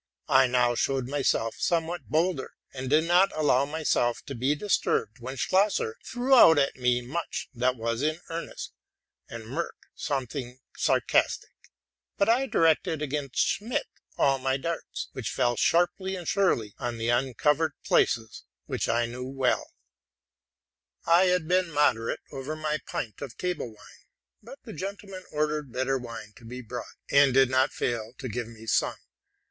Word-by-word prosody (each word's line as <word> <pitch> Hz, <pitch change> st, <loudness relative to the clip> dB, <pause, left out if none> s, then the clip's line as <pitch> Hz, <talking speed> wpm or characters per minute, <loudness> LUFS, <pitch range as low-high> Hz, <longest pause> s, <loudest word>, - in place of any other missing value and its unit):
I 130 Hz, 0 st, +6 dB
now 125 Hz, -1 st, +3 dB
showed 130 Hz, +1 st, 0 dB
myself 135 Hz, -5 st, 0 dB
somewhat 170 Hz, -2 st, -1 dB
bolder, 160 Hz, -1 st, 0 dB, 0.2 s
and 130 Hz, -1 st, -5 dB
did 155 Hz, +3 st, +4 dB
not 175 Hz, +3 st, +4 dB
allow 145 Hz, -3 st, +3 dB
myself 145 Hz, -5 st, 0 dB
to 140 Hz, -, -6 dB
be 135 Hz, +4 st, +1 dB
disturbed 150 Hz, -, 0 dB
when 130 Hz, +3 st, -6 dB
Schlosser 210 Hz, -, +1 dB
threw 255 Hz, +2 st, 0 dB
out 165 Hz, -, +8 dB
at 140 Hz, -1 st, +2 dB
me 125 Hz, -1 st, +1 dB
much 160 Hz, +8 st, -4 dB
that 125 Hz, +1 st, +1 dB
was 115 Hz, 0 st, -2 dB
in 155 Hz, +2 st, 0 dB
earnest, 165 Hz, +1 st, -6 dB, 0.6 s
and 115 Hz, -1 st, -7 dB
Merck 140 Hz, +10 st, -4 dB, 0.2 s
something 130 Hz, -3 st, -4 dB, 0.2 s
sarcastic; -, -, +1 dB, 0.6 s
but 200 Hz, -, +2 dB
I 250 Hz, +4 st, +3 dB
directed 160 Hz, -, +2 dB
against 140 Hz, -2 st, -3 dB
Schmid 225 Hz, +5 st, 0 dB, 0.3 s
all 135 Hz, -1 st, +3 dB
my 130 Hz, +1 st, 0 dB
darts, 165 Hz, +4 st, -4 dB
which -, -, -4 dB
fell 120 Hz, 0 st, +1 dB
sharply 175 Hz, -, +1 dB
and 175 Hz, -3 st, -7 dB
surely 120 Hz, -, +1 dB
on 120 Hz, -2 st, -3 dB
the 115 Hz, +1 st, -1 dB
uncovered 135 Hz, +5 st, +2 dB
places, 110 Hz, -2 st, +1 dB, 0.2 s
which -, -, -2 dB
I 120 Hz, +1 st, +2 dB
well 125 Hz, +2 st, -1 dB
knew. -, -, -11 dB, 1.4 s
I 170 Hz, +3 st, +5 dB
had 180 Hz, -3 st, +1 dB
been 180 Hz, 0 st, +2 dB
moderate 140 Hz, -7 st, +1 dB
over 135 Hz, +3 st, -5 dB
my 155 Hz, -1 st, -2 dB
pint 110 Hz, -5 st, -5 dB
of 135 Hz, -5 st, -7 dB
table 180 Hz, -7 st, -2 dB
wine; 110 Hz, -2 st, -16 dB, 0.4 s
but -, -, -11 dB
the -, -, -9 dB
gentlemen 195 Hz, +1 st, -7 dB
ordered 150 Hz, -2 st, -1 dB
better 130 Hz, +2 st, 0 dB
wine 115 Hz, -3 st, -8 dB
to -, -, -17 dB
be 125 Hz, +2 st, -7 dB
brought, 120 Hz, +2 st, -6 dB, 0.3 s
and 140 Hz, -2 st, +5 dB
did 135 Hz, -1 st, +5 dB
not 130 Hz, +1 st, +3 dB
fail 115 Hz, -1 st, -2 dB
to 130 Hz, -, -5 dB
give 120 Hz, 0 st, -4 dB
me 115 Hz, -1 st, -12 dB
some. 110 Hz, -, +1 dB
135 Hz, 155 wpm, -27 LUFS, 125-165 Hz, 1.4 s, out